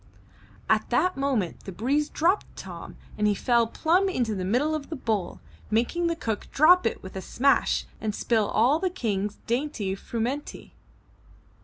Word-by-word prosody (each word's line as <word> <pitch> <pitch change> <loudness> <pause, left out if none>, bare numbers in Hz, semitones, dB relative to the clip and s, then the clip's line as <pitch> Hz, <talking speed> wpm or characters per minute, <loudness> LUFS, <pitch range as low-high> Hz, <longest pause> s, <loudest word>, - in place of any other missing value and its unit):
At - - +2
that 365 0 +2
moment 265 -10 -1
the 195 - -6
breeze 275 - 0
dropped 355 +6 0
Tom - - -9 0.2
and 210 - +3
he 205 - +2
fell 235 +1 +2
plumb 350 - +2
into 245 - -1
the 190 -2 -3
middle 250 +11 +1
of 305 -2 -4
the 320 - -4
bowl, 220 - -2 0.3
making 240 +11 +1
the 335 - 0
cook 225 -9 -3
drop 355 +5 +6
it - - -4
with 190 - -9
a 190 - -4
smash 275 +8 +2 0.2
and 215 -2 -2
spill 220 -3 +1
all 255 +8 +3
the 370 +1 0
King's 210 - -2
dainty 235 -6 -1
frumenty. 235 +8 -4
245 Hz, 165 wpm, -26 LUFS, 210-310 Hz, 0.3 s, drop